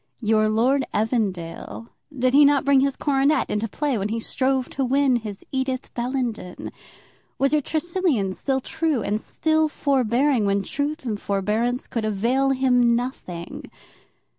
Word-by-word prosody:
Your 215 0 +3
Lord 255 +6 +2
Evandale, 210 -2 -2 0.3
did 255 0 +1
he 290 +1 +7
not 285 -1 +4
bring 280 -1 +5
his 275 0 +1
coronet 285 +1 +1
into 210 +2 -1
play 275 +1 -1
when 200 +2 -2
he 230 +1 -2
strove 260 +2 0
to 275 - -2
win 265 0 +2
his 210 -4 -8
Edith 260 -1 -3
Bellenden? 240 -6 -3 0.7
Was 275 +2 +1
your 300 - +3
Tresilian 315 - 0
still 265 +5 -1
true 315 -5 -1
and 210 +1 -1
still 315 +5 0
forbearing 265 -3 +1
when 200 0 +1
truth 290 +3 -3
and 215 -4 -3
forbearance 215 +5 -1
could 230 - -3
avail 235 +6 +1
him 250 -3 +3
nothing? 210 -9 -5
255 Hz, 145 wpm, -23 LUFS, 215-275 Hz, 0.7 s, he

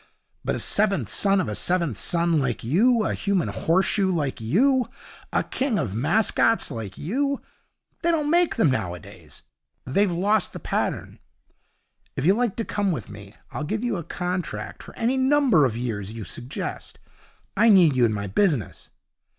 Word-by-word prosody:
But - - -1
a - - -3
seventh 200 -1 +1
son 195 -1 +2
of 185 - -1
a - - -3
seventh 170 - +1
son 170 - +1
like 130 -4 -2
you, 215 - +3
a - - 0
human 200 -4 0
horseshoe 190 +3 +1
like 145 -9 -2
you, 245 - +2 0.4
a - - +1
king 260 -5 -1
of 95 - -2
mascots 215 - +2
like 105 -4 -6
you 275 - -1 0.6
they 340 - +1
don't 305 -3 +1
make 345 0 +3
them 165 - +3
nowadays. 90 -8 -6 0.4
They've 195 +9 +1
lost 200 +4 +1
the - - -7
pattern. - - -3 1.0
If 130 - -2
you 190 - +6
like 235 -1 0
to 230 - -3
come 200 -2 -1
with 120 - -5
me 100 0 -12 0.2
I'll - - -4
give 215 +9 -3
you 240 -4 -1
a 170 - -5
contract 180 +2 -4
for - - -13
any 245 +3 0
number 260 - +4
of 115 -3 -1
years 110 -4 -4
you 115 - -6
suggest. 120 +7 -6 0.6
I 225 +3 +4
need 175 -9 +6
you 125 - +3
in 115 - +3
my 100 -1 -3
business.' 125 - -1
180 Hz, 170 wpm, -24 LUFS, -, 1.0 s, you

